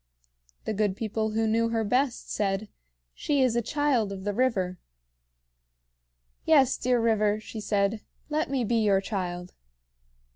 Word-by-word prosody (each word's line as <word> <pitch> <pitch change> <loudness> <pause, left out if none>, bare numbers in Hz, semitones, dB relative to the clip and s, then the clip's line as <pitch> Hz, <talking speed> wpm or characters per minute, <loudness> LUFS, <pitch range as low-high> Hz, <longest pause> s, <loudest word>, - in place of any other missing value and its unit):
The - - -1
good 205 -2 0
people 220 0 -2
who 225 +1 +1
knew 230 +1 +2
her 225 -1 0
best 250 +4 0
said: 200 0 -1 0.4
"She 285 -2 +1
is 255 -3 +2
the 235 - +1
child 255 -4 0
of 190 -1 -6
the 205 0 -1
river." 195 -7 0 1.6
"Yes, 275 -5 +4
dear 250 0 +1
river," 215 -2 +2
she 220 +1 -8
said, 205 +1 0 0.3
"let 305 -1 -1
me 265 -2 0
be 230 +1 +1
your 200 -2 +4
child." 180 -3 -4
220 Hz, 145 wpm, -27 LUFS, 200-245 Hz, 1.6 s, Yes